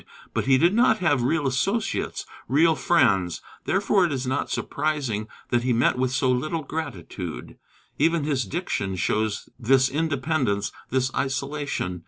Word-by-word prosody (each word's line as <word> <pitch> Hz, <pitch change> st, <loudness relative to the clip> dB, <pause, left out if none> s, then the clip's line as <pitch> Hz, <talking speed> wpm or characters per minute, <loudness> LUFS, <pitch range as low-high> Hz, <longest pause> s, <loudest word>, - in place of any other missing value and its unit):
But -, -, -1 dB
he 130 Hz, 0 st, +5 dB
did 170 Hz, +7 st, +4 dB
not 230 Hz, -1 st, +4 dB
have 150 Hz, -, +2 dB
real 150 Hz, +4 st, +1 dB
associates, 140 Hz, -, -1 dB, 0.2 s
real 160 Hz, +6 st, +4 dB
friends; 100 Hz, -, +2 dB, 0.3 s
therefore 195 Hz, 0 st, +2 dB
it 175 Hz, -, +1 dB
is 130 Hz, -2 st, -2 dB
not 130 Hz, +2 st, -1 dB
surprising 135 Hz, -9 st, -2 dB, 0.2 s
that 120 Hz, -, +3 dB
he 125 Hz, 0 st, +1 dB
met 115 Hz, -, +3 dB
with 130 Hz, 0 st, 0 dB
so 130 Hz, 0 st, +2 dB
little 155 Hz, +6 st, -1 dB
gratitude. 145 Hz, -, -6 dB, 0.4 s
Even 165 Hz, +1 st, +3 dB
his 140 Hz, -5 st, 0 dB
diction 95 Hz, 0 st, -2 dB
shows 110 Hz, +4 st, -1 dB
this 130 Hz, +2 st, +4 dB
independence, 140 Hz, -8 st, 0 dB, 0.2 s
this 130 Hz, +1 st, 0 dB
isolation. 140 Hz, -8 st, -2 dB
135 Hz, 145 wpm, -25 LUFS, 120-155 Hz, 0.4 s, he